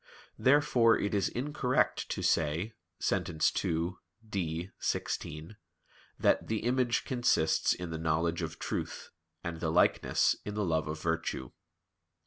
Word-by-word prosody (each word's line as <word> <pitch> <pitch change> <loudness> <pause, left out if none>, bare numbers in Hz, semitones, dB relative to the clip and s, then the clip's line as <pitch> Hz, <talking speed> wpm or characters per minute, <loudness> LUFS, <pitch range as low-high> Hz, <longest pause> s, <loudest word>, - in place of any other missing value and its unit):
Therefore 125 -4 +5
it 100 - -2
is 100 -2 +2
incorrect 130 -1 0
to - - -3
say 85 +7 +1 0.2
(Sent. - - 0 0.3
ii, 85 +2 0 0.4
D, 90 -2 -3
xvi) 80 +7 -3 0.6
that - - +2
"the 110 -1 -1
image 120 0 +1
consists 120 - +2
in 90 -2 -6
the 80 - -4
knowledge 80 +1 0
of 80 -1 -4
truth, - - -4 0.3
and 85 -2 -4
the 80 - -1
likeness 85 +3 +3
in 105 - -5
the 105 -1 0
love 80 -2 0
of 80 +1 -4
virtue." 80 -6 -2
85 Hz, 130 wpm, -31 LUFS, 80-115 Hz, 0.6 s, Therefore